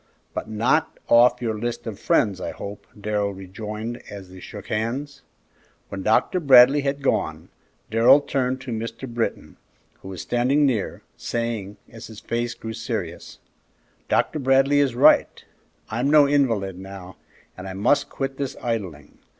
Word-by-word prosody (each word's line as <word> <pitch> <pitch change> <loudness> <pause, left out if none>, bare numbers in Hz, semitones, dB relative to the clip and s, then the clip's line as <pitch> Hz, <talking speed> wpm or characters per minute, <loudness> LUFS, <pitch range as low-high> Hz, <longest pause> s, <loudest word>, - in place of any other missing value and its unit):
"But - - -5
not 115 +9 +1
off 120 +1 +5
your 110 -2 -2
list 120 +1 -4
of 110 -4 -6
friends, 105 - +1
I - - -3
hope," 100 0 -8
Darrell 105 -1 -1
rejoined, 105 +5 -6
as 95 -3 -10
they 95 - -11
shook - - -10
hands. 135 +6 -3 0.7
When 95 - -5
Dr. 110 - +2
Bradley 135 -1 +7
had 140 0 -2
gone, 80 - -1 0.4
Darrell 115 +5 +6
turned 130 -2 -2
to 130 -1 -7
Mr. 115 +3 -5
Britton, 115 -1 -4 0.4
who - - -11
was 95 -1 -6
standing 130 +5 +2
near, 120 -8 -1
saying, 115 -4 -3
as 115 -1 -11
his 110 -2 -11
face 120 0 -3
grew 110 -1 -7
serious, 110 -7 -5 0.7
"Dr. 155 - +1
Bradley 135 +1 +3
is 135 -4 +1
right; - - +4 0.5
I'm 120 +5 0
no 150 -1 +7
invalid 115 -10 +1
now, 95 -1 -10 0.4
and 95 +1 -8
I 95 - -6
must 135 +9 +1
quit 135 0 -4
this 140 -1 -4
idling. 95 - -5
115 Hz, 150 wpm, -23 LUFS, 100-135 Hz, 0.7 s, Bradley